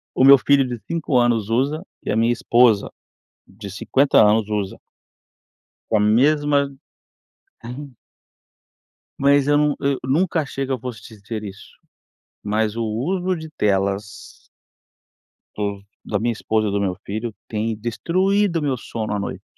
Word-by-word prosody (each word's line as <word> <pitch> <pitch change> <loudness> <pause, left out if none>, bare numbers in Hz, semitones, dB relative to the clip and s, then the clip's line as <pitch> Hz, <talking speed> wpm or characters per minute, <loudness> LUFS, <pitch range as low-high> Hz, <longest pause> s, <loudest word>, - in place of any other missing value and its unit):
o - - +3
meu 140 +1 +9
filho 140 +1 +3
de 120 -2 -5
5 160 -5 0
anos 115 -3 +1
usa 140 +8 0 0.2
e - - -2
a - - 0
minha 115 +2 +3
esposa 120 -3 +3 0.6
de 100 +1 -10
50 135 +7 +2
anos 105 0 +3
usa. 105 -2 -2 1.1
Com 110 - +3
a - - +2
mesma 145 +6 +3 1.0
Ain 130 +4 -8 1.3
Mas 140 0 +3
eu 145 0 +4
num 150 -1 +2
eu 140 -1 0
nunca 160 +6 +1
achei 135 -1 -4
que 135 - -5
eu 130 - -3
fosse 120 -4 -7
te 110 0 -13
dizer 110 +1 -6
isso, 100 -1 -11 0.6
mas 105 +1 -1
o 115 - -1
uso 175 - -1
de 160 -1 -8
telas 100 -3 -2 1.1
do 100 -1 -3 0.2
da 105 - -2
minha 120 +3 0
esposa 110 -1 -1
e - - -1
do 100 - 0
meu 95 -2 -1
filho, 110 +4 -4 0.2
tem 110 -1 -2
destruído 175 - 0
meu 140 -3 0
sono 110 -2 -5
à - - -1
noite. 100 - -5
120 Hz, 155 wpm, -21 LUFS, 105-140 Hz, 1.3 s, meu